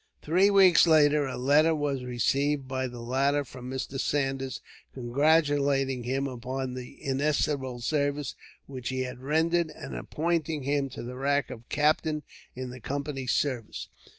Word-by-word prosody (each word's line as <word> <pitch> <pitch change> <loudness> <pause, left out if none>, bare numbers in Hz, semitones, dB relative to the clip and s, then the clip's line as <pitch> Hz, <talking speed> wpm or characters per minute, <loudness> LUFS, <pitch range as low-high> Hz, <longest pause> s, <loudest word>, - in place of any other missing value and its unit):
Three 185 +6 +4
weeks 190 -4 +6
later, 150 -2 +5
a 130 - -4
letter 150 +5 +4
was 145 -3 -1
received 135 +3 0
by 130 0 -2
the 120 -1 -8
latter 140 +4 +1
from 125 0 -9
Mr. 130 +1 -4
Saunders, 135 -2 -1 0.4
congratulating 140 -1 +2
him 135 +2 -1
upon 130 0 -4
the 125 -1 -8
inestimable 140 -2 0
service 145 +1 -1 0.3
which 130 -3 -6
he 130 0 -2
had 125 -1 -5
rendered, 160 +4 +1
and 150 -2 -8
appointing 160 -2 -1
him 140 0 0
to 130 - -8
the 125 +1 -7
rank 140 0 0
of 115 +1 -10
captain 150 0 +1 0.3
in 130 0 -5
the 125 - -9
Company's 140 0 -3
service. 125 -6 -2
140 Hz, 150 wpm, -28 LUFS, 130-150 Hz, 0.4 s, weeks